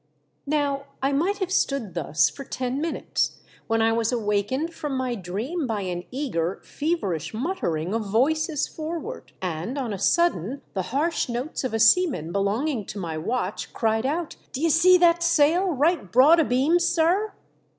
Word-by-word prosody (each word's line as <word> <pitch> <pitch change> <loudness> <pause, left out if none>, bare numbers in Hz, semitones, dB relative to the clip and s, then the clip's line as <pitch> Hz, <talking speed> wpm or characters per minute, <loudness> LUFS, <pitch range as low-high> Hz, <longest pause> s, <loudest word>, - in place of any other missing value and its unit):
Now 285 -2 0 0.2
I 275 - +2
mioht 355 +9 +1
have 375 -1 -1
stood 275 - 0
thus 155 -2 +2
for 275 - -7
ten 255 +1 -3
minutes, 330 +1 -2 0.3
when 225 0 +2
I 225 - +3
was 230 0 +1
awakened 235 +8 -1
from 290 -4 -4
my 255 -1 -1
dream 235 - -3
by 220 -3 -2
an 180 -2 -4
eager 195 - -2
feverish 200 - -2
muttering 195 - -2
of 220 -3 -2
voices 300 +7 +1
forward, 335 +10 -6
and 180 - -3
on 245 -6 -2
a 195 - -5
sudden 275 - +1
the 190 - -1
harsh 300 +3 0
notes 245 +7 -3
of 255 -3 -2
a - - 0
seaman 225 - +4
belonging 215 - 0
to - - -7
my 170 -5 -4
watch 190 +4 -3
cried 225 +2 0
out, 320 +3 -3
" - - -34
D'ye 320 +5 +1
see 355 +4 +6
that 345 -1 +4
sail 340 +3 +3
right 305 - +1
broad 290 +7 +6
a 320 - +4
beam, 275 +8 +3
sir 355 +5 +1
260 Hz, 170 wpm, -25 LUFS, 210-325 Hz, 0.3 s, see